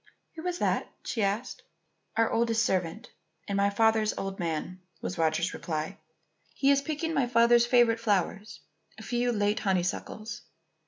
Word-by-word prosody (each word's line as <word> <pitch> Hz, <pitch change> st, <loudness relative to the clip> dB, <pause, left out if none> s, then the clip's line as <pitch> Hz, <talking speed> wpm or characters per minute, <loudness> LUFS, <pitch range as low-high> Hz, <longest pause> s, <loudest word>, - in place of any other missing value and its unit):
"Who 330 Hz, +2 st, -6 dB
is 355 Hz, -1 st, -1 dB
that?" -, -, 0 dB, 0.2 s
she 230 Hz, -, -2 dB
asked. 205 Hz, +5 st, -1 dB, 0.6 s
"Our 225 Hz, 0 st, +3 dB
oldest 225 Hz, -1 st, +2 dB
servant, 180 Hz, -3 st, -2 dB, 0.4 s
and 200 Hz, -, -2 dB
my 200 Hz, 0 st, +3 dB
father's 220 Hz, +1 st, +2 dB
own 195 Hz, 0 st, -4 dB
man," 170 Hz, +2 st, -3 dB, 0.2 s
was 180 Hz, -, -5 dB
Roger's 165 Hz, +2 st, +1 dB
reply. 155 Hz, -2 st, -4 dB, 0.6 s
"He 275 Hz, +1 st, +3 dB
is 280 Hz, 0 st, +3 dB
picking 315 Hz, +2 st, -3 dB
my 265 Hz, -5 st, +2 dB
father's 235 Hz, 0 st, +5 dB
favourite 240 Hz, -2 st, +4 dB
flowers, 205 Hz, -1 st, -1 dB, 0.4 s
a -, -, -10 dB
few 245 Hz, 0 st, 0 dB
late 205 Hz, -1 st, +1 dB
honeysuckles." 210 Hz, +5 st, -2 dB
220 Hz, 150 wpm, -28 LUFS, 190-240 Hz, 0.6 s, father's